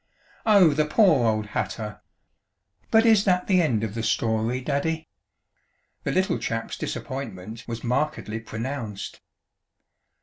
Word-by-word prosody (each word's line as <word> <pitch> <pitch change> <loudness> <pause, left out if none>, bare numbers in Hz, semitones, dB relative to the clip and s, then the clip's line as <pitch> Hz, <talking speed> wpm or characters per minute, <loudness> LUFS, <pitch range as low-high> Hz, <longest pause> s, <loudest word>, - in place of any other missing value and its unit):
"Oh, 200 -6 +7
the 155 +1 +2
poor 155 - +4
old 110 -1 +1
hatter! 105 +1 -4 0.9
But 225 +1 +5
is 220 -3 +6
that 180 -2 +2
the 185 -2 +4
end 120 -10 +1
of 110 -2 -3
the 115 - -3
story, 115 +2 0
Daddy?" 155 +4 -1 1.0
The - - 0
Little 185 +1 +1
Chap's 115 0 -3
disappointment 115 -4 -6
was 115 -1 -5
markedly 125 -3 -1
pronounced. 115 -2 -5
125 Hz, 125 wpm, -25 LUFS, 110-160 Hz, 1.0 s, Oh